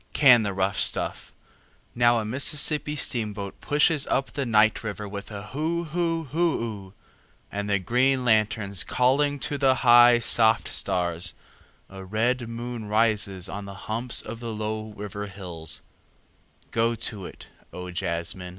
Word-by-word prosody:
Can 125 -5 +6
the 100 -2 -2
rough 95 +1 -1
stuff… - - +2 0.6
now 120 0 +3
a 110 - -2
Mississippi 150 +5 +1
steamboat 105 -7 -2
pushes 150 0 +2
up 135 - -1
the 140 -3 -2
night 110 -1 +3
river 105 -1 -5
with 100 0 -7
a 105 -1 -8
hoo 160 +4 -2
hoo 165 0 -1
hoo 160 +4 0
oo… 100 -4 -7 0.6
and 100 0 -4
the 100 - +3
green 125 +7 +1
lanterns 105 -3 +1
calling 145 +3 +1
to 150 -1 0
the 135 -1 +4
high 120 0 +8
soft 115 -2 +2
stars… 90 -1 -1 0.5
a 95 0 -10
red 115 +5 -1
moon 115 -1 -6
rides 105 -4 +1
on 100 +1 -6
the 100 0 -9
humps 115 +3 -1
of 115 +1 -7
the 115 -1 -5
low 110 0 -4
river 105 0 -6
hills… 90 -5 -5 0.9
go 115 +1 +1
to 110 -4 -3
it, - - -14 0.2
O 90 0 -7
jazzmen. 85 +1 -3
110 Hz, 150 wpm, -25 LUFS, 100-125 Hz, 0.9 s, high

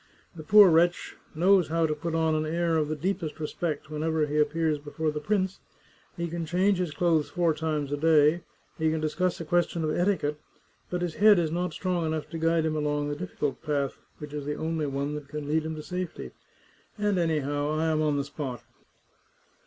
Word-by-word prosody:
The 160 - -8
poor 205 +5 +8
wretch 170 +2 +2 0.2
knows 180 +1 +4
how 165 +1 +1
to 155 - 0
put 165 +2 -4
on 160 -1 +2
an 155 0 +1
air 170 +1 0
of 155 -2 +1
the 155 - -2
deepest 170 -1 -3
respect 155 -1 -3
whenever 155 0 0
he 150 +1 -1
appears 150 0 +1
before 150 +2 -3
the 150 - -4
prince; 190 +2 -1 0.6
he 170 0 -2
can 170 0 -4
change 185 +4 +1
his 180 -2 0
clothes 160 0 +1
four 175 -3 +1
times 155 -2 -2
a 145 - 0
day, 155 +1 +4 0.4
he 160 0 +2
can 160 0 0
discuss 170 +4 -1
a 165 - -5
question 170 0 +1
of 155 - 0
etiquette, 175 -5 0 0.5
but 180 0 -2
his 175 -2 -2
head 210 +2 +6
is 165 -3 +1
not 175 +1 -1
strong 180 -2 -1
enough 155 -1 -2
to 165 - -4
guide 165 0 +2
him 155 -1 0
along 145 -1 -1
the 145 - -2
difficult 145 -5 -4
path 145 -3 -2 0.2
which 150 -1 -9
is 150 -1 -4
the 150 +1 -3
only 160 -1 -2
one 140 +1 -2
that 150 -1 -6
can 150 0 -6
lead 155 +1 +1
him 160 0 -4
to 155 - -7
safety. 180 0 -5 0.7
And 205 -3 +1
anyhow, 145 -3 0
I 155 +1 0
am 155 -1 +1
on 150 -2 +1
the 140 - 0
spot." 140 -3 -6
160 Hz, 205 wpm, -27 LUFS, 150-170 Hz, 0.7 s, poor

